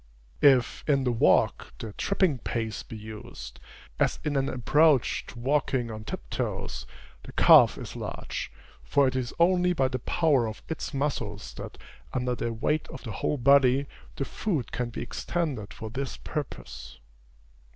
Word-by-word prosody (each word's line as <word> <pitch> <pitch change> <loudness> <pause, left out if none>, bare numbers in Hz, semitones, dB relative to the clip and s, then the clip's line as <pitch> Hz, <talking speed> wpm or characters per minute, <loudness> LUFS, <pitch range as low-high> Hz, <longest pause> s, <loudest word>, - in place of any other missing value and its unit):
If, 135 -5 +4
in 140 -3 +3
the 125 - +1
walk, 115 - +2
the 110 -2 -7
tripping 185 - +1
pace 110 -2 -3
be 110 - -9
used, 110 0 -9 0.4
as - - +2
in 150 -1 -1
an 135 0 +1
approach 145 +2 +3
to - - -11
walking 130 -2 0
on 110 0 -7
tiptoes, - - -4 0.3
the - - -11
calf - - +7
is - - -7
large; - - -5 0.3
for 140 -1 +3
it 130 - -1
is 125 -2 -1
only 180 +1 +4
by 135 -6 +2
the 130 0 -3
power 140 -2 +2
of 110 - -7
its 160 - -4
muscles 125 -8 -3
that, - - -8 0.4
under 125 -1 0
the 115 -1 -2
weight 150 +7 -1
of - - -9
the 115 - -5
whole 150 - -1
body, 135 +1 +5 0.3
the 135 - -2
foot 160 - -2
can 125 -1 -2
be 120 - -5
extended 140 - -3
for 110 -1 -7
this 135 +2 -4
purpose. 65 - -6
130 Hz, 160 wpm, -27 LUFS, 115-145 Hz, 0.4 s, calf